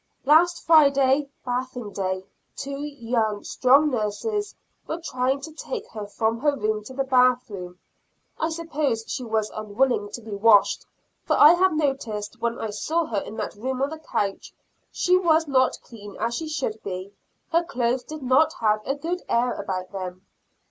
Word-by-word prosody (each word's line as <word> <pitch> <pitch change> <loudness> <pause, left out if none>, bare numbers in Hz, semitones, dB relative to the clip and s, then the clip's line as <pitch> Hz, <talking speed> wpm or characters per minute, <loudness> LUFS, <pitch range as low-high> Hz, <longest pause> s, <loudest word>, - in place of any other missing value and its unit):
Last 340 +5 +4
Friday 280 -3 +5 0.2
bathing 250 -3 -3
day 190 -1 -3 0.3
two 275 +1 -5
young, 230 -7 -1
strong 280 +4 +4
nurses 330 - -2 0.3
were 325 - -3
trying 265 -3 -1
to 315 +3 -8
take 440 +7 -6
her 210 -2 -6
from 220 +2 -1
her 290 +2 +2
room 215 -4 -1
to 260 - -9
the 270 - 0
bath 255 -1 +3
room 180 -2 -7 0.6
(I 320 - 0
suppose 305 -8 -2
she 255 - -4
was 220 -2 -1
unwilling 215 +1 0
to 240 - -6
be 220 - -9
washed, 205 0 +4 0.4
for - - +1
I 300 +3 +9
have 370 0 +3
noticed 250 -8 -2
when 235 0 -1
I 220 - -4
saw 320 +11 -1
her 220 -8 -1
in 215 - -8
that 215 - -3
room 255 +5 -4
on 275 +2 0
the 315 - -7
couch, 200 -10 -3 0.4
she 365 +1 +3
was 320 -3 +3
not 260 -2 +2
clean 205 -4 -11
as 230 +1 -1
she 320 +2 -4
should 225 -8 -3
be 190 +1 -6 0.4
her 335 +1 +3
clothes 250 -6 0
did 305 +2 -9
not 275 +5 +4
have 215 -9 +1
a 275 - 0
good 340 +5 -3
air 240 +1 +2
about 185 -2 -4
them). 185 -1 -6
255 Hz, 175 wpm, -24 LUFS, 215-300 Hz, 0.6 s, I